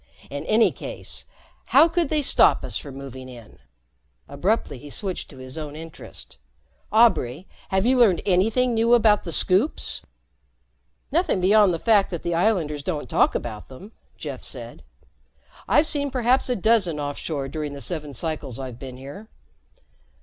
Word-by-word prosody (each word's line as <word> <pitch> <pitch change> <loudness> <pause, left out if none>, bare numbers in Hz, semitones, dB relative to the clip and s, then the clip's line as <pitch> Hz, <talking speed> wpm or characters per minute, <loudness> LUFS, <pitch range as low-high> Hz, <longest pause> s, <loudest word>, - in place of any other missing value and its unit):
In 140 0 -4
any 220 +1 +4
case, - - -8 0.4
how 325 - +6
could 335 -2 0
they 305 -2 +1
stop - - +4
us - - -6
from 140 -3 -5
moving 130 -1 -9
in?" 120 -3 -13 0.7
Abruptly 145 - -1
he 145 - -11
switched 190 +5 -4
to - - -13
his 130 +4 -8
own 150 -1 -6
interest. 160 +1 -10 0.5
"Aubray, 190 - +3 0.2
have 190 +2 +1
you 255 +1 +3
learned 205 -8 +4
anything 220 +7 +2
new 230 +1 +4
about 215 -4 +3
the 170 - -4
Scoops?" 190 - +1 1.1
"Nothing 325 - +1
beyond 200 +1 +5
the 170 - -1
fact 210 0 +3
that 170 -3 -5
the 170 - -1
islanders 170 -5 +1
don't 150 -4 -3
talk - - +2
about 110 -3 -5
them," 180 +12 -12 0.3
Jeff - - -6
said. - - -9 0.9
"I've 295 - +4
seen 285 -2 -1
perhaps 255 0 +1
a 250 - +1
dozen 195 -7 +2
offshore 145 0 -3
during 150 0 -4
the 140 - -7
seven 150 -1 -4
cycles 140 -2 -4
I've 130 -3 -7
been 130 -1 -8
here. 140 +11 -10
175 Hz, 155 wpm, -24 LUFS, 140-225 Hz, 1.1 s, how